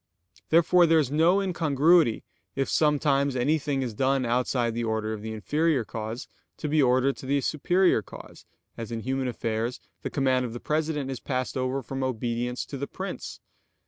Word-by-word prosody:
Therefore 170 +2 +5
there 165 0 +5
is 145 -4 +1
no 165 +6 +4
incongruity 165 - +3 0.3
if 135 0 0
sometimes 140 -2 +2
anything 145 +1 0
is 120 -3 -4
done 135 +3 +1
outside 120 0 0
the 120 +1 -2
order 110 -1 -1
of 105 - -6
the 110 +1 -5
inferior 145 +5 0
cause, 110 +6 -6 0.3
to 155 - -4
be 150 +1 +3
ordered 130 +1 +3
to 130 - -9
the 140 +1 +2
superior 175 +2 +2
cause, - - -12 0.3
as 115 0 -6
in 115 -1 -3
human 130 +2 -2
affairs 115 0 -2 0.2
the - - -3
command 130 -2 +1
of 120 -2 -4
the 120 - -6
president 150 -2 -1
is 130 - -5
passed 130 -2 -3
over 130 +1 -1
from 135 +3 -5
obedience 125 0 -2
to 140 - -7
the 140 +1 -4
prince. - - -7
135 Hz, 175 wpm, -26 LUFS, 120-150 Hz, 0.3 s, Therefore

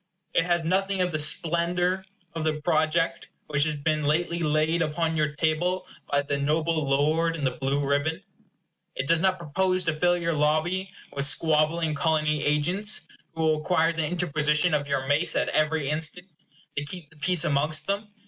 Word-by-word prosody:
It 165 - +2
has 175 -1 +1
nothing 190 +3 0
of 180 -1 +1
the 155 - -1
splendor 170 +4 +1 0.3
of 165 -1 -4
the 155 -1 -1
project 165 +1 0 0.2
which 145 0 +2
has 155 -1 -1
been 150 +1 -1
lately 170 +3 0
laid 155 +1 +1
upon 160 +1 -1
your 150 -1 0
table 175 +4 0 0.2
by 145 0 +1
the 140 0 -2
noble 155 +1 0
lord 155 +4 +2
in 155 - -5
the 130 - +1
blue 135 +1 -2
ribbon. 150 +6 -1 0.7
It 135 - -2
does 165 +1 +3
not 185 +2 +2
propose 185 +3 0
to 165 -2 -2
fill 175 +1 +3
your 170 -1 -1
lobby 155 +6 0 0.2
with 140 0 +2
squabbling 155 +2 +2
Colony 155 0 0
agents, 175 +9 +1 0.3
who 160 - -2
will 155 -1 +3
require 165 0 +1
the 160 -2 -1
interposition 155 -1 +1
of 145 -1 0
your 140 -2 -1
mace, 150 +5 +2
at - - +1
every 155 -1 +1
instant, 160 +4 -1 0.5
to 140 - -2
keep 160 0 -5
the 160 - -18
peace 175 +2 +2
amongst 150 +1 +1
them. 200 +3 -2
160 Hz, 175 wpm, -26 LUFS, 150-170 Hz, 0.7 s, does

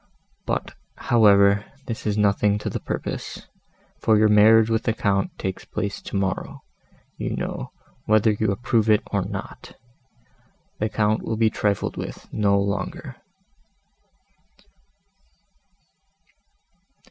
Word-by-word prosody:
But, - - -2 0.2
however, 100 -3 +4 0.2
this 115 -2 -5
is 105 0 0
nothing 105 0 +2
to 105 - -4
the - - -3
purpose—for 110 -1 -4
your 110 0 +4
marriage 110 +1 +6
with 110 0 +1
the 115 - 0
Count 100 -3 0
takes 95 -1 -4
place 100 -1 -4
tomorrow, 95 -1 -3 0.6
you - - -2
know, - - -5 0.4
whether 110 0 +4
you 105 0 0
approve 110 +1 0
it 105 -1 +4
or - - +1
not. - - -8 1.0
The 110 - 0
Count 110 0 +1
will 110 - -3
be 110 -1 +3
trifled 100 -2 -1
with - - -7
no 100 -2 +2
longer." 100 0 -4
105 Hz, 110 wpm, -23 LUFS, 100-110 Hz, 1.0 s, marriage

